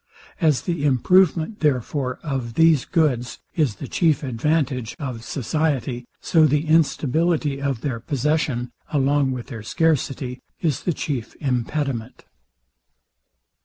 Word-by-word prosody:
As 155 -6 +2
the 170 -5 -2
improvement, 165 - +3
therefore, 130 -2 0
of 130 -6 -3
these 160 -4 +4
goods 135 -8 0 0.2
is 145 -10 +1
the 130 - -7
chief 155 +1 +2
advantage 130 -2 -1
of 125 -5 -5
society, 130 -2 -1
so 160 -2 +4
the 150 +2 +1
instability 155 -1 +2
of 135 -5 -1
their 125 -4 -2
possession, 140 -2 -1 0.2
along 140 -1 +2
with 125 -2 -4
their 110 - -6
scarcity, 135 -1 0 0.2
is 155 -6 0
the 175 - +1
chief 130 -7 -4
impediment. 130 -2 -2
140 Hz, 120 wpm, -23 LUFS, 125-155 Hz, 0.2 s, these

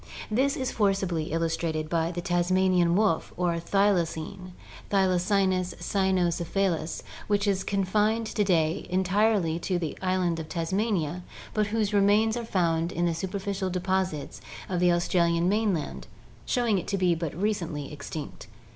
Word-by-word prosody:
This 270 +6 +2
is 260 -1 -2
forcibly 195 -6 0
illustrated 165 -1 -1
by 165 0 0
the 175 0 -4
Tasmanian 175 0 +2
wolf 200 -5 +1
or 175 -1 +1
thylacine 180 -1 0 0.4
(Thylacynus 185 -1 +2
cynocephalus) 180 -3 0 0.2
which 205 0 +1
is 195 -2 +1
confined 210 +3 +1
to 215 -1 0
day 170 -2 +1
entirely 190 -2 +2
to 180 +1 -1
the 165 -3 -3
island 185 -3 0
of 155 -1 -7
Tasmania 180 -1 -1 0.3
but 210 -1 +1
whose 215 -1 -1
remains 205 +2 +4
are 240 - -3
found 170 -5 0
in 175 -2 0
the 170 - +1
superficial 190 +2 -3
deposits 185 -4 -2 0.3
of 180 -2 -1
the 180 0 +4
Australian 170 0 +2
mainland, 200 -6 -1 0.4
showing 235 -6 +2
it - - -8
to 200 - -1
be 180 -2 +3
but 165 -3 -4
recently 170 -9 -2
extinct. 145 +1 -7
185 Hz, 140 wpm, -27 LUFS, 170-200 Hz, 0.4 s, remains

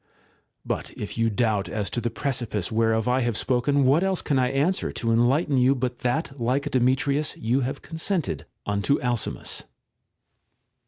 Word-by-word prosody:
\ - - -42 0.2
But - - -3
if 105 - -5
you 115 0 +2
doubt 110 -2 0
as 105 -2 -2
to 120 - -2
the 120 - -1
precipice 115 -6 -2
whereof 110 0 +1
I 125 +1 +2
have 120 -3 0
spoken, 130 +3 +1
what 145 +7 +4
else 190 -1 0
can 140 -4 +1
I 125 -1 +2
answer 145 +8 +1
to 115 - -1
enlighten 130 +6 +3
you 130 +2 +4
but 125 -1 -3
that 135 +2 -2
like 130 +4 +1
Demetrius 135 +4 +1
you 120 +4 +1
have 135 +2 -3
consented 160 - -2 0.2
unto 105 +7 +1
Alcimus 120 -3 -2
125 Hz, 165 wpm, -25 LUFS, 115-140 Hz, 0.2 s, what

